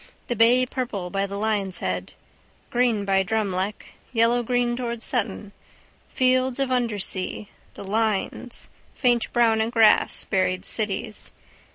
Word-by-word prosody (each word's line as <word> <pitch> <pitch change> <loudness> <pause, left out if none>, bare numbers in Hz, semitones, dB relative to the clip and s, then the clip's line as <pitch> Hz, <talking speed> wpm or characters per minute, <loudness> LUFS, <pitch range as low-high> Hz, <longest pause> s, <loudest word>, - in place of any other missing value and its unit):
The 240 - 0
bay 240 +3 +5
purple 230 -9 -4
by 195 0 -1
the 200 0 -6
Lion's 200 -4 -1
head. 90 - -3 0.6
Green 240 -4 +1
by 195 -1 +3
Drumleck. 200 -1 -2 0.3
Yellowgreen 240 +1 +2
towards 235 -2 -4
Sutton. 215 -4 -2 0.6
Fields 255 0 +1
of 270 -1 0
undersea, 210 -5 -1 0.3
the - - -8
lines 220 +3 -2 0.2
faint 240 -3 +1
brown 230 -2 +3
in 220 - 0
grass, 225 -2 +4
buried 185 -1 0
cities. 210 -1 -3
220 Hz, 125 wpm, -24 LUFS, 200-240 Hz, 0.6 s, bay